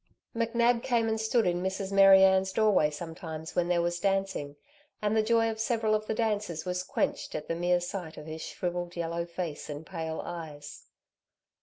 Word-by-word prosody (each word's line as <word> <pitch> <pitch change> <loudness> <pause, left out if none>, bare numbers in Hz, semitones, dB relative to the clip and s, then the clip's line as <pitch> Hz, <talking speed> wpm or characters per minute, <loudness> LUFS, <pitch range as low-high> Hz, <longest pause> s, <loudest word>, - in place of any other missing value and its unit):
McNab 235 +1 +2
came 235 -2 +1
and 220 0 0
stood 220 +1 +2
in 175 0 +1
Mrs. 190 +1 -3
Mary 195 -1 +8
Ann's 190 0 +4
doorway 205 -7 +3
sometimes 160 0 -7
when 175 -1 +2
there 175 -1 +2
was 175 0 -1
dancing, 195 -7 -1 0.4
and 210 +1 0
the 220 - +4
joy 225 +1 +3
of 220 - -7
several 220 -1 +1
of 215 0 0
the 220 - -1
dancers 210 -7 -1
was 180 0 -1
quenched 185 - -2
at 150 - -4
the - - -1
mere 175 +1 +2
sight 175 -2 -6
of 150 - -8
his 160 0 -7
shrivelled 175 0 -4
yellow 170 0 -2
face 170 -4 -5
and 150 +2 -6
pale 160 -3 -4
eyes. 150 -4 -8
180 Hz, 185 wpm, -29 LUFS, 165-215 Hz, 0.4 s, Mary